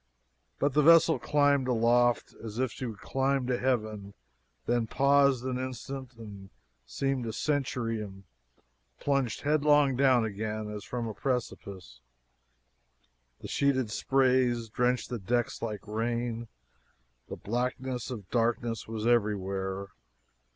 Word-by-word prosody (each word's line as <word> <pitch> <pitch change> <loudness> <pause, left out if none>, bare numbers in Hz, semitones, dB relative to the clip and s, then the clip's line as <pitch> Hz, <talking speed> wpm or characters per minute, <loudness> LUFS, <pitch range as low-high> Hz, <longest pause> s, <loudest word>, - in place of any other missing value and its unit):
But 140 -1 +1
the 150 - +4
vessel 165 +1 +6
climbed 145 -2 +2
aloft 120 0 +2
as 110 -1 -7
if 130 -2 0
she 130 - -5
would 110 -3 -8
climb 135 0 0
to 125 -1 -1
heaven 110 -6 -2 0.5
then 120 +3 +1
paused 140 -1 +3
an 130 -1 -2
instant 130 0 -6
that 100 -4 -10 0.4
seemed 135 -3 -2
a - - -2
century 125 -4 -1
and 95 -2 -9 0.8
plunged 140 -5 0
headlong 145 -2 +3
down 130 -3 +4
again, 105 0 -4
as 105 -1 -6
from 120 -2 -4
a 110 - -4
precipice. 100 - -4 1.4
The - - -7
sheeted 130 -5 +1
sprays 125 -3 +2
drenched 125 +3 0
the 120 - -3
decks 120 +5 -1
like 105 -3 -4
rain. 115 +2 -2 0.8
The - - -5
blackness 125 +2 -3
of 110 -7 -7
darkness 115 -1 0
was 110 -1 -4
everywhere. 100 -4 0
120 Hz, 125 wpm, -29 LUFS, 110-130 Hz, 1.4 s, vessel